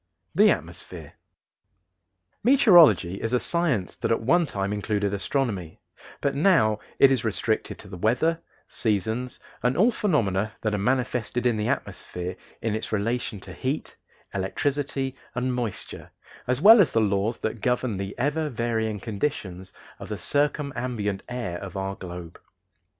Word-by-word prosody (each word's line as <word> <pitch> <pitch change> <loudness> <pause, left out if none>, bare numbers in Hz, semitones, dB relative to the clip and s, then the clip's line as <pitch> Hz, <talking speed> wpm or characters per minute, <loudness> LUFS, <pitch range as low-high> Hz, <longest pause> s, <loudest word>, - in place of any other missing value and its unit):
THE - - +6
ATMOSPHERE. - - -4 1.3
Meteorology 175 - +6
is 115 +2 -2
a 125 - +4
science 150 - 0
that - - -2
at 115 - +2
one 165 +9 +3
time 100 -3 -2
included 105 -1 -1
astronomy, 100 - -2 0.4
but 140 - +1
now 140 - +3 0.2
it 135 - +7
is 130 -4 +1
restricted 110 0 -1
to 105 - -13
the 95 -2 -8
weather, 160 - +1 0.3
seasons, 110 +4 -1 0.2
and 125 +1 +1
all 220 +7 +5
phenomena 110 - 0
that 110 -1 0
are - - +1
manifested 125 +1 0
in 120 -2 +3
the 105 0 -1
atmosphere 90 -7 -3 0.3
in 110 -1 0
its 110 - -3
relation 110 0 -1
to 90 - -10
heat, 130 - -3 0.4
electricity, 135 +7 -1 0.2
and 125 0 0
moisture, 120 -4 -5 0.4
as 125 +2 0
well 220 +3 +9
as 170 - +3
the 115 - +2
laws 105 +2 +1
that 110 0 -4
govern 125 -3 0
the 100 +1 -5
ever 150 +4 0
varying 115 -3 -1
conditions 100 - -3 0.3
of - - -8
the - - -3
circumambient 125 -8 -1
air 115 -9 -4
of 95 -1 -7
our 95 0 -2
globe. 90 -2 -9
115 Hz, 145 wpm, -25 LUFS, 100-135 Hz, 1.3 s, well